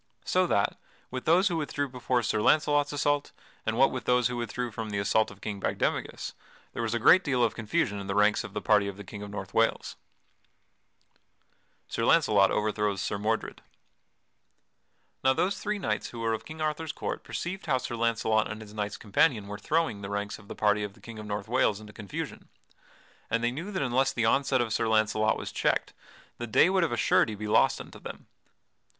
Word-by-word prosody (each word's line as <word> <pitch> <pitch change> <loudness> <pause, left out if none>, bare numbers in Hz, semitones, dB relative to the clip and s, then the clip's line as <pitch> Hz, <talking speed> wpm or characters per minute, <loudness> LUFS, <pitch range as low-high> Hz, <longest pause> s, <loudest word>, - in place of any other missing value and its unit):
So, - - +2
what - - +1 0.3
with 130 -1 -5
those 180 +5 +5
who 175 -3 0
withdrew 145 -2 -2
before 125 -1 -1
Sir 110 -1 0
Launcelot's 145 +2 +3
assault, 145 0 0 0.4
and 110 +1 0
what 135 +2 +5
with 130 - -5
those 125 -1 +3
who 125 - -3
withdrew 120 +1 -3
from 110 0 -5
the 100 - -2
assault 100 +2 +2
of 100 -1 -14
King 105 -2 -4
Bagdemagus, - - -2 0.4
there - - -3
was 115 0 -1
a - - +2
great 180 +11 +6
deal 130 -4 +1
of 115 - +2
confusion 105 -2 -1
in 100 - -7
the 100 - -2
ranks 105 +1 +3
of - - -9
the - - -3
party 105 -2 +4
of 100 -1 -6
the 105 - -8
King 100 +2 -9
of 105 - -7
North 95 -2 -7
Wales. 115 0 +1 1.9
[Sidenote: - - -16
Sir 115 - 0
Launcelot 105 -13 +5
overthrows 105 -2 0
Sir 100 - -2
Mordred] 110 +2 -2 1.6
Now 130 0 +5
those 185 +8 0
three 210 0 -2
knights 195 - -2
who 115 - -7
were 115 0 +1
of 110 - -4
King 155 0 -8
Arthur's 155 0 -1
court - - -4
perceived 180 +1 -5
how 135 -4 +3
Sir 125 -1 -4
Launcelot 115 -2 +1
and 110 - -5
his 105 -1 -11
knights 105 -1 -3
companion 110 +1 +2
were 100 0 -7
throwing 160 -10 0
the 100 - -6
ranks 100 +1 -3
of 100 - -17
the - - -7
party 105 0 +2
of 100 -1 -5
the - - -19
King 115 -2 -9
of 105 - -8
North 105 0 -4
Wales 110 -4 +2
into 105 -1 -12
confusion, 105 -4 -7 0.8
and 115 +1 0
they 120 - +2
knew 165 +11 -5
that 190 - -1
unless 130 +1 +2
the 115 - 0
onset 135 +2 +3
of 115 -2 -1
Sir 115 - +1
Launcelot 110 -1 +2
was - - -6
checked, - - 0 0.5
the 120 - -4
day 160 +11 +5
would 190 -2 +3
of 165 - 0
a 120 - -1
surety 110 - +3
be 105 +1 -5
lost 105 - +3
unto - - -10
them. - - -9
115 Hz, 210 wpm, -28 LUFS, 105-135 Hz, 1.9 s, great